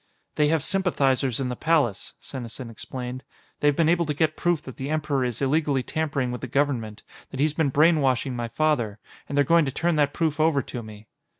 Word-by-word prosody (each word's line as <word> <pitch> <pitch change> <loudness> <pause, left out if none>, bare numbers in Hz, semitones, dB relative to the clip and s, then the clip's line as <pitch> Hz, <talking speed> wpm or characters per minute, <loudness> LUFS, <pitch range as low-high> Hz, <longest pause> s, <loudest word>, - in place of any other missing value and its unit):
"They 150 - +2
have 155 -1 +1
sympathizers 140 -10 +1
in 130 -2 -1
the 125 - -3
Palace," 120 -8 0
Senesin 120 -2 -7
explained. 125 +2 -6 0.4
"They've 145 -1 +3
been 165 0 +3
able 170 0 +2
to 150 - -1
get 155 +1 +1
proof 175 -3 0
that 130 - -10
the 135 +2 -4
Emperor 150 -3 0
is 125 +1 -2
illegally 140 -1 +1
tampering 140 -4 -1
with 125 -2 -5
the 130 - -4
Government, 120 -5 -1 0.3
that 135 - -8
he's 150 +1 +2
been 160 -2 +1
brainwashing 140 -4 +3
my 120 -1 -3
father. 120 -5 0 0.3
And 140 - -2
they're 145 - +4
going 165 +1 +4
to 135 - -2
turn 170 +4 0
that 145 -1 +3
proof 155 -1 -1
over 155 -4 +3
to 120 - -6
me." 110 -1 -11
140 Hz, 205 wpm, -25 LUFS, 125-155 Hz, 0.4 s, they're